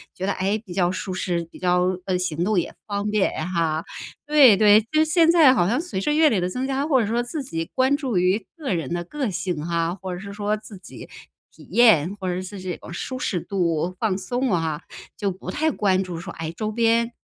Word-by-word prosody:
觉 185 Hz, -, -4 dB
得， -, -, +1 dB
诶， 195 Hz, +3 st, 0 dB
比 185 Hz, -5 st, -9 dB
较 175 Hz, -2 st, +2 dB
舒 185 Hz, +1 st, -4 dB
适， 175 Hz, -2 st, -2 dB
比 -, -, -12 dB
较 180 Hz, 0 st, +1 dB
呃， 185 Hz, -, 0 dB
行 170 Hz, -2 st, -2 dB
动 215 Hz, -1 st, +1 dB
也 -, -, -4 dB
方 205 Hz, 0 st, -2 dB
便 210 Hz, -2 st, +1 dB, 0.2 s
哈， 165 Hz, -2 st, 0 dB, 0.4 s
对， 290 Hz, -8 st, +7 dB
对。 210 Hz, +1 st, +6 dB
就 220 Hz, -, -19 dB
是 315 Hz, -, +5 dB
现 325 Hz, +1 st, +4 dB
在 320 Hz, -6 st, +7 dB
好 175 Hz, -8 st, +2 dB
像 245 Hz, +9 st, +1 dB
随 345 Hz, -, -4 dB
着 295 Hz, +10 st, 0 dB
阅 310 Hz, 0 st, +5 dB
历 210 Hz, -8 st, +1 dB
的 180 Hz, -, 0 dB
增 255 Hz, +7 st, -3 dB
加 275 Hz, +2 st, -1 dB
或 265 Hz, -5 st, +3 dB
者 210 Hz, -, -1 dB
说 235 Hz, +3 st, 0 dB
自 275 Hz, +4 st, -4 dB
己 165 Hz, -10 st, -4 dB
关 260 Hz, +2 st, +3 dB
注 260 Hz, -10 st, -2 dB
于 185 Hz, +3 st, +1 dB
个 290 Hz, -, -3 dB
人 165 Hz, -1 st, -3 dB
的 175 Hz, 0 st, -2 dB
个 270 Hz, -, -3 dB
性 175 Hz, -4 st, -3 dB
啊， 170 Hz, +1 st, -1 dB
或 185 Hz, -1 st, -4 dB
者 180 Hz, -, -7 dB
是 200 Hz, 0 st, -8 dB
说 205 Hz, +1 st, -1 dB
自 210 Hz, -2 st, -11 dB
己 -, -, -12 dB, 0.4 s
体 -, -, -16 dB
验， 205 Hz, -6 st, +5 dB
或 190 Hz, -2 st, -4 dB
者 180 Hz, -, -3 dB
是 185 Hz, +1 st, -8 dB
这 180 Hz, -2 st, -4 dB
种 170 Hz, -, -11 dB
舒 255 Hz, +8 st, -5 dB
适 180 Hz, -8 st, -1 dB
度、 175 Hz, -1 st, -1 dB
放 205 Hz, -4 st, 0 dB
松 245 Hz, +4 st, -1 dB
啊， 160 Hz, -2 st, -1 dB, 0.4 s
就 200 Hz, -, -1 dB
不 190 Hz, 0 st, -6 dB
太 315 Hz, +1 st, 0 dB
关 190 Hz, -5 st, +1 dB
注 180 Hz, -3 st, -6 dB
说， 170 Hz, 0 st, -7 dB
哎， 165 Hz, 0 st, -5 dB
周 215 Hz, +5 st, -4 dB
边， 230 Hz, +1 st, +2 dB
195 Hz, 255 characters per minute, -23 LUFS, 180-240 Hz, 0.4 s, 对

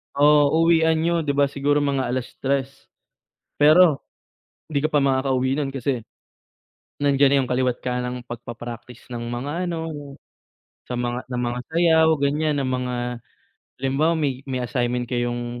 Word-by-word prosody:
So 145 Hz, 0 st, +5 dB
uwian 160 Hz, 0 st, +4 dB
niyo 170 Hz, 0 st, +1 dB
'di 140 Hz, -, +1 dB
ba 145 Hz, -, +4 dB
siguro 145 Hz, +1 st, +1 dB
mga 140 Hz, -2 st, 0 dB
3:00, 135 Hz, +2 st, -3 dB, 0.7 s
pero 155 Hz, 0 st, +5 dB, 0.6 s
'di 145 Hz, -2 st, -1 dB
ka 155 Hz, -, 0 dB
pa 145 Hz, -, +4 dB
makakauwi 130 Hz, -1 st, +1 dB
nun 140 Hz, -2 st, -2 dB
kasi, 130 Hz, -3 st, -2 dB, 1.0 s
nandiyan 140 Hz, -1 st, +4 dB
na -, -, +5 dB
'yung 130 Hz, -, -3 dB
kaliwa't-kanang 125 Hz, 0 st, -1 dB
pagpapractice 120 Hz, 0 st, -9 dB
ng 120 Hz, -1 st, -5 dB
mga 135 Hz, +9 st, -3 dB
ano, 165 Hz, -2 st, -3 dB, 1.0 s
sa 125 Hz, -1 st, -5 dB
mga 120 Hz, +1 st, -2 dB
ng 125 Hz, -, -2 dB
mga 120 Hz, +1 st, -3 dB
sayaw 160 Hz, -1 st, +4 dB
ganiyan, 145 Hz, +1 st, +1 dB
ng 135 Hz, -, -1 dB
mga 125 Hz, -1 st, -3 dB, 0.8 s
halimbawa 135 Hz, +5 st, +1 dB
may 140 Hz, -5 st, -1 dB
may 130 Hz, -2 st, -2 dB
assignment 125 Hz, -1 st, -1 dB
kayong 120 Hz, 0 st, -3 dB
135 Hz, 140 wpm, -23 LUFS, 125-150 Hz, 1.0 s, So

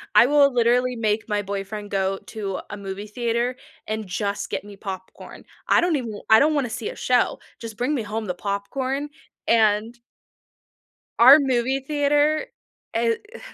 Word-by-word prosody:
I -, -, +8 dB
will 285 Hz, -1 st, +4 dB
literally 245 Hz, +1 st, +2 dB
make 215 Hz, -1 st, -1 dB
my 210 Hz, -1 st, 0 dB
boyfriend 200 Hz, +1 st, -5 dB
go 195 Hz, 0 st, 0 dB
to 200 Hz, -3 st, -4 dB
a 205 Hz, -, -6 dB
movie 200 Hz, +1 st, -6 dB
theater 235 Hz, +2 st, -1 dB, 0.3 s
and 215 Hz, 0 st, -3 dB
just 200 Hz, +2 st, -3 dB
get -, -, -3 dB
me 205 Hz, 0 st, -11 dB
popcorn. 190 Hz, -2 st, -9 dB, 0.2 s
I -, -, +4 dB
don't 345 Hz, -2 st, +1 dB
even 230 Hz, -7 st, -4 dB
I 220 Hz, 0 st, +8 dB
don't 305 Hz, +2 st, +3 dB
wanna 280 Hz, -5 st, 0 dB
see 220 Hz, 0 st, -4 dB
a -, -, -8 dB
show, 250 Hz, -1 st, +1 dB, 0.2 s
just 225 Hz, -2 st, -8 dB
bring 255 Hz, +5 st, 0 dB
me 240 Hz, -, -2 dB
home 215 Hz, +1 st, -4 dB
the 180 Hz, -, -2 dB
popcorn 260 Hz, +9 st, -3 dB, 0.4 s
and 225 Hz, +1 st, +2 dB, 1.2 s
our 260 Hz, +5 st, +10 dB
movie 265 Hz, -1 st, 0 dB
theater? 295 Hz, +2 st, +1 dB, 0.5 s
Eh, 230 Hz, 0 st, +2 dB
uh, 420 Hz, -, -7 dB
230 Hz, 165 wpm, -23 LUFS, 205-265 Hz, 1.2 s, our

